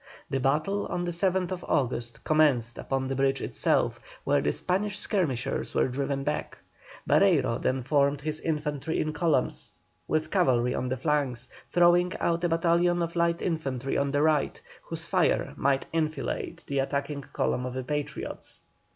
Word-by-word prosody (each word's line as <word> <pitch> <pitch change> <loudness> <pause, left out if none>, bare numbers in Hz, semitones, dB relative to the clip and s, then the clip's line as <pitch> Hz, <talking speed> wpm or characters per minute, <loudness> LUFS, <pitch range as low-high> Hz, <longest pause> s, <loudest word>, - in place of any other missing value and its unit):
The 135 - +1
battle 155 +10 +1
of 175 - -2
the 175 - -1
7th 180 0 0
August 120 -3 -1
commenced 140 -7 +2
upon 135 -1 -2
the 135 - -2
bridge 135 0 +2
itself, - - 0 0.2
where - - +2
the 75 - +1
Spanish 195 - -1
skirmishers 135 - -1
were - - +3
driven 135 +1 -2
back. 150 +1 -3 0.5
Barreiro 160 -12 +3
then 130 0 0
formed 140 +1 +2
his 155 +1 -3
infantry 150 -1 -2
in 155 0 -1
columns, 155 -7 0 0.3
with 155 0 0
cavalry 125 -10 +3
on 130 - -2
the 130 - -1
flanks, 130 -3 0 0.2
throwing 175 +1 +4
out 170 0 0
a 175 - +2
battalion 170 +1 +2
of 170 +1 -4
light 170 0 +1
infantry 135 -6 -2
on 140 0 +1
the 145 +1 +1
right, 155 -2 +2 0.2
whose - - -6
fire - - +1
might 135 0 +1
enfilade 155 -3 -2
the 140 -1 -1
attacking 140 +1 -2
column 125 -1 -1
of 125 - -6
the 130 - -2
Patriots. 145 +2 -4
150 Hz, 160 wpm, -28 LUFS, 135-170 Hz, 0.5 s, throwing